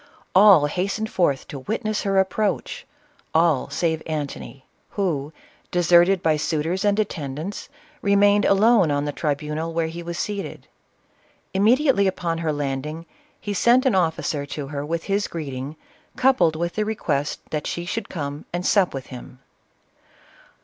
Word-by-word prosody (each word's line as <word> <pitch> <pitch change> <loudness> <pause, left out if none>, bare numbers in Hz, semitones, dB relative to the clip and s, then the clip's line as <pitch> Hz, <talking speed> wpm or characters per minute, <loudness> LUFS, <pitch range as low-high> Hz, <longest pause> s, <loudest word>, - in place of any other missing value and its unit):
All 190 -5 +7
hastened 200 +7 -2
forth 145 -7 +1
to 140 - -6
witness 215 - -2
her 195 -1 0
approach, 195 +1 -1 0.2
— - - -36
all 160 -4 +3
save 160 -2 -1
Antony, 145 -3 -5 0.2
who, 155 -8 -2 0.4
deserted 175 +1 +4
by 155 -1 +3
suitors 160 +5 -1
and 205 0 +2
attendants, 160 - -4 0.3
re 200 0 +2
mained 205 +1 +4
alone 200 -2 +4
on 145 0 0
the 145 - -2
tribunal 150 +2 -2
where 165 -1 +1
he 165 +2 -6
was 170 0 -6
seated. 200 +1 -5 0.9
Immediately 220 +2 +3
upon 170 -3 -2
her 165 -2 -1
landing, 145 +3 -4 0.3
he 205 - -4
sent 240 +6 +4
an 260 - +3
officer 160 -5 0
to 140 -1 -6
her 145 -1 -4
with 165 +2 -3
his 200 +1 0
greeting, 140 -3 -6 0.4
coupled 255 -12 +3
with 170 +2 -2
the 215 - 0
request 155 -10 -2
that 150 -1 -2
she 175 0 -4
would 225 - -4
come 145 -3 -5
and 175 +1 -3
sup 190 -7 +3
with 130 -2 -5
him. 125 0 -10
170 Hz, 150 wpm, -23 LUFS, 150-200 Hz, 0.9 s, All